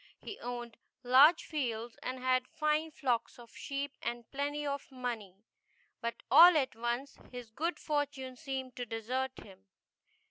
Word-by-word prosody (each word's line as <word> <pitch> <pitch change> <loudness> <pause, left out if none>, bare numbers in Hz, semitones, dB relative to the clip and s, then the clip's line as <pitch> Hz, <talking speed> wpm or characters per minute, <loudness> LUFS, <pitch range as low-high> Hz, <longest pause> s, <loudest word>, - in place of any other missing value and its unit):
He 415 - -9
owned 240 -2 -6 0.3
large 265 +7 +7
fields, 240 -6 -3
and 255 +1 -4
had 255 0 +1
fine 305 +1 0
flocks 255 -6 -1
of 235 -2 -15
sheep, 280 0 -4
and 235 0 -4
plenty 290 +2 -2
of 280 -1 -4
money. 240 -7 -5 0.7
But 235 -1 -4
all 345 -1 +10
at 265 -6 0
once 240 +4 -3
his 245 -3 -8
good 330 +9 -2
for 290 -2 0
tune 265 -3 -8
seemed 265 -2 -5
to 245 - -3
desert 255 +4 -3
him. 195 -1 -15
255 Hz, 150 wpm, -32 LUFS, 240-285 Hz, 0.7 s, all